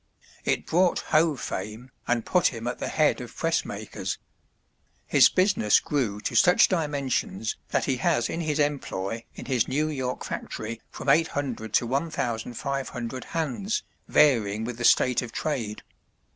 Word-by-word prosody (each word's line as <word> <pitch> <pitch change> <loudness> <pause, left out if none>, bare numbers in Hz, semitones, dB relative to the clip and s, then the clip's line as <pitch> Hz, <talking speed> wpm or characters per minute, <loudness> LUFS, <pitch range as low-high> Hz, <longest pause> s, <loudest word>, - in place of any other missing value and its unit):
It - - 0
brought 180 +1 +2
Hoe 155 0 +4
fame 110 +2 -6 0.2
and 120 -2 +1
put 180 -2 +3
him 115 -2 -4
at 125 - -3
the - - -3
head 150 -4 +2
of 120 - -9
press 165 0 +1
makers. 100 -2 -5 0.9
His - - +6
business 185 - +3
grew 120 -9 -1
to - - -3
such 180 +1 +6
dimensions 140 - -1
that - - +1
he 130 -2 0
has 120 -1 +1
in 170 - -3
his 155 -2 -1
employ 115 -8 -2
in - - -8
his 125 -4 +1
New 150 +4 0
York 130 -4 -3
factory 115 +1 -5
from - - -9
800 140 -7 +1
to - - +3
1,500 125 -2 -3
hands, 165 - -2 0.2
varying 110 -7 +3
with 120 0 -5
the 120 - 0
state 125 +1 +4
of 120 -2 -7
trade. 115 -9 -3
130 Hz, 150 wpm, -26 LUFS, 115-150 Hz, 0.9 s, His